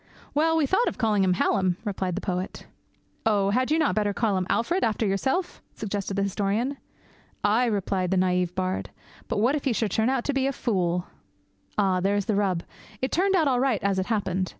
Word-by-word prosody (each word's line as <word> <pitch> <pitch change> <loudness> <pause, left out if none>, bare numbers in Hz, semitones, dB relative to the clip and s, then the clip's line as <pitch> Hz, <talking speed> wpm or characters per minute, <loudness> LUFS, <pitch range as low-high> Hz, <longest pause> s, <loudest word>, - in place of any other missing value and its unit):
'Well, 325 +2 +3
we 310 - +3
thought 385 - +2
of - - -2
calling 215 -5 +2
him 185 -1 +3
Hallam,' 185 -1 +1
replied 190 -3 -2
the 195 - -3
poet. 185 -1 -4 0.6
'Oh! 200 -3 +2
had 255 +4 +1
you 310 - +3
not 315 -2 +2
better 205 -2 0
call 220 -4 +1
him 185 -1 -1
Alfred, 340 +11 +1
after 220 0 +1
yourself?' 265 - -1
suggested 200 -2 -3
the 200 - +1
historian. 205 +7 -1 0.7
'Aye!' 225 +4 +3
replied 195 -4 0
the 190 - +1
naïve 180 -1 +1
bard, 185 0 -2 0.4
'but - - -2
what 235 +6 +3
if 295 -1 -2
he 260 - +2
should 220 -3 -1
turn 220 +5 +2
out 260 -2 0
to 285 - -1
be 270 0 +1
a - - +1
fool?' 180 -8 0 0.7
Ah, 190 -3 +2
there's 200 +1 +1
the 215 - 0
rub. 190 -4 +1 0.4
It 260 - -2
turned 385 +3 +2
out 325 -5 +3
all 255 -2 +2
right, 255 -5 +2
as 200 -1 +1
it 190 - -2
happened. 190 -5 -1
205 Hz, 210 wpm, -26 LUFS, 190-255 Hz, 0.7 s, Well